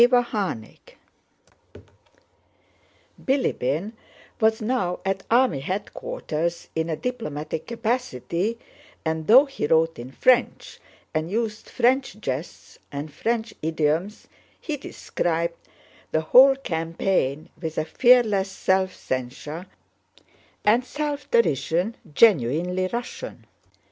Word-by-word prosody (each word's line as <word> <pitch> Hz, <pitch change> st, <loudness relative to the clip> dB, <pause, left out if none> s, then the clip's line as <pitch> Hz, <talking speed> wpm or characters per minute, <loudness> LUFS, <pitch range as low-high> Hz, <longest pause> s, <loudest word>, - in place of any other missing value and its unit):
CHAPTER 240 Hz, -, +2 dB
IX -, -, -21 dB, 2.3 s
Bilíbin 205 Hz, -, 0 dB, 0.5 s
was 220 Hz, 0 st, +3 dB
now 215 Hz, -6 st, -1 dB
at 195 Hz, 0 st, 0 dB
army 235 Hz, -, +3 dB
headquarters 170 Hz, -, -3 dB
in 160 Hz, +1 st, -1 dB
a 160 Hz, -, 0 dB
diplomatic 155 Hz, -9 st, -4 dB
capacity, 225 Hz, -, -2 dB, 0.5 s
and 160 Hz, 0 st, -2 dB
though 255 Hz, +6 st, +8 dB
he 275 Hz, -, -3 dB
wrote 165 Hz, -1 st, +2 dB
in 125 Hz, +2 st, -8 dB
French 250 Hz, -, +2 dB, 0.3 s
and 155 Hz, +1 st, -1 dB
used 220 Hz, +1 st, -3 dB
French 250 Hz, -4 st, +1 dB
jests 140 Hz, -4 st, -5 dB
and 145 Hz, +1 st, -6 dB
French 230 Hz, +5 st, -1 dB
idioms, 160 Hz, +5 st, -1 dB, 0.3 s
he 310 Hz, -, -3 dB
described 170 Hz, -, -3 dB, 0.4 s
the 155 Hz, -, +2 dB
whole 260 Hz, +12 st, +7 dB
campaign 165 Hz, -, -1 dB
with 160 Hz, -2 st, -4 dB
a 155 Hz, -, 0 dB
fearless 215 Hz, 0 st, +4 dB
self 190 Hz, -1 st, 0 dB
censure 135 Hz, +7 st, -5 dB, 1.0 s
and 225 Hz, +4 st, +4 dB
self 290 Hz, +1 st, -4 dB
derision 175 Hz, -, +1 dB, 0.2 s
genuinely 180 Hz, -, +3 dB
Russian. 240 Hz, -, -6 dB
190 Hz, 100 wpm, -24 LUFS, 160-235 Hz, 2.3 s, though